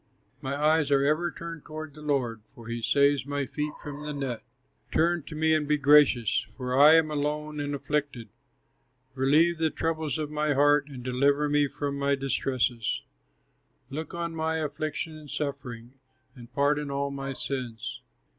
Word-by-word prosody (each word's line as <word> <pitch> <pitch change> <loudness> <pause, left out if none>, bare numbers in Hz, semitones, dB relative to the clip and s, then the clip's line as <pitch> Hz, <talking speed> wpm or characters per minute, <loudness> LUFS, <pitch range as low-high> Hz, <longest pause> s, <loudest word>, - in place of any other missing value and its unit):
My 135 +1 -2
eyes 155 0 +3
are 140 -1 +3
ever 155 +4 +2
turned 165 -2 -8
toward 155 -1 -7
the 150 - -12
Lord, 130 -7 -1
For 115 -3 -12
he 115 0 -3
saves 140 +1 +3
my 145 -1 -1
feet 150 +3 -3
from 145 -1 -7
the 150 0 -4
net. 135 -5 -3 0.5
Turn 170 +1 +2
to 155 - -8
me 160 +1 +2
and 155 -2 +1
be 150 0 +3
gracious, 140 -5 +4
For 125 -1 -2
I 150 +4 +8
am 160 -1 +3
alone 150 +1 -2
and 145 0 -2
afflicted; 140 -5 -2 0.8
Relieve 155 +6 +3
the 160 -1 +2
troubles 160 -1 -2
of 150 -1 -3
my 150 -1 0
heart, 145 +1 +4
And 130 -3 -8
deliver 140 +4 +2
me 145 0 +3
from 140 0 -4
my 140 0 +2
distresses; 130 -4 -1 0.9
Look 155 +3 -5
on 170 -1 -3
my 160 0 -1
affliction 155 +1 -3
and 155 -1 -12
suffering, 130 -5 -5 0.4
And 120 -2 -13
pardon 145 +1 +1
all 140 0 -1
my 135 0 -4
sins. 120 -3 -5
145 Hz, 165 wpm, -27 LUFS, 135-155 Hz, 0.9 s, I